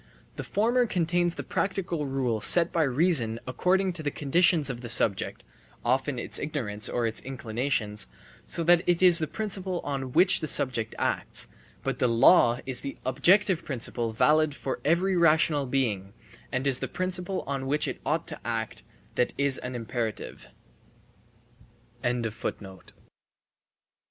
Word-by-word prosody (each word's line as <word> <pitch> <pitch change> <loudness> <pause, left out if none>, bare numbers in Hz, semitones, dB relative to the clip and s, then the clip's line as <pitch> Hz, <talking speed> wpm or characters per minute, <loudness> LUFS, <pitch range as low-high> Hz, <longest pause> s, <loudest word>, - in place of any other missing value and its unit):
The - - -5
former 240 +4 +1
contains 175 -2 0
the - - -5
practical 175 -6 -2
rule 130 -5 -1
set 175 +7 +4
by 165 - +2
reason 135 -5 +2
according 185 +8 0
to 170 - -6
the 150 - -1
conditions 160 +2 +2
of 125 -3 -4
the 120 - -7
subject 110 -3 +1 0.4
(often 130 +2 0
its 120 - -2
ignorance 115 -9 -2
or 120 -1 -1
its 115 -1 -2
inclinations), 120 -4 -3 0.4
so 170 - +2
that 175 +1 +5
it 175 +1 +2
is 175 -2 +7
the 155 - -1
principle 190 -3 -3
on 135 -3 -4
which 180 +7 +5
the 155 - -4
subject 120 -6 +1
acts; - - 0 0.3
but - - -3
the 125 - +2
law 120 +1 +5
is 130 -2 0
the 140 - -6
objective 180 +7 +3
principle 120 -3 -2
valid 150 +5 +2
for 135 - -4
every 180 +4 +2
rational 155 -4 +3
being, 105 -7 -1 0.4
and 130 +1 -2
is 135 -2 +3
the - - -3
principle 185 +1 -2
on 135 -1 -4
which 150 +2 0
it - - -5
ought 155 +1 -1
to - - -7
act 115 -2 -4 0.3
that 125 - 0
is 140 -1 +2
an 125 0 -6
imperative. 115 -2 -5
140 Hz, 145 wpm, -27 LUFS, 120-175 Hz, 0.4 s, is